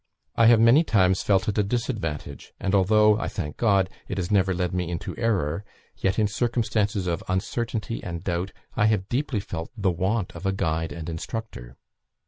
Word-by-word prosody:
I 115 - +5
have 115 -1 +7
many 120 +8 +6
times 95 - +3
felt 95 -2 +2
it 105 0 0
a - - +4
disadvantage, 100 - -4
and 95 0 -1
although, 105 +2 +4
I - - -2
thank 75 -6 -5
God, 100 -5 +3 0.2
it 95 - -4
has 90 0 -2
never 95 -2 +3
led 90 -1 -1
me 90 -2 -1
into 85 -1 -4
error, 100 -7 0 0.3
yet, 95 0 0
in 110 -2 +3
circumstances 110 -3 0
of 85 -2 -2
uncertainty 115 +4 -2
and 85 -1 -5
doubt, 90 +1 -2 0.2
I 105 - +3
have 100 -3 0
deeply 125 -3 -1
felt 85 -4 -6
the 100 -3 +1
want 95 +4 -1
of 95 - -4
a 95 - +1
guide 80 -4 -1
and 80 +2 -7
instructor." 80 - -6
95 Hz, 185 wpm, -25 LUFS, 90-110 Hz, 0.3 s, have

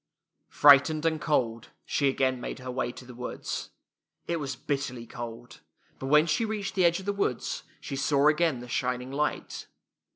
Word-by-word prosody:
Frightened 145 +2 +6
and 160 -1 +1
cold, 115 -6 0 0.2
she 140 -2 +1
again 130 -2 0
made - - -5
her 130 -1 -6
way 125 -1 -2
to 125 - -12
the 125 - -11
woods. 125 +1 -5 0.6
It 170 -1 -1
was 140 -3 -4
bitterly 130 -4 -3
cold; 120 0 -8 0.4
but 135 - -4
when 150 +3 +6
she 165 +7 +1
reached 215 -3 -3
the 185 -2 +3
edge 170 +1 +3
of 190 - -9
the 200 - 0
woods 200 -11 -1 0.2
she - - -6
saw 140 +1 +3
again 155 -4 +2
the 125 - -9
shining 125 +1 -2
light. 150 +2 -2
140 Hz, 175 wpm, -28 LUFS, 125-155 Hz, 0.6 s, Frightened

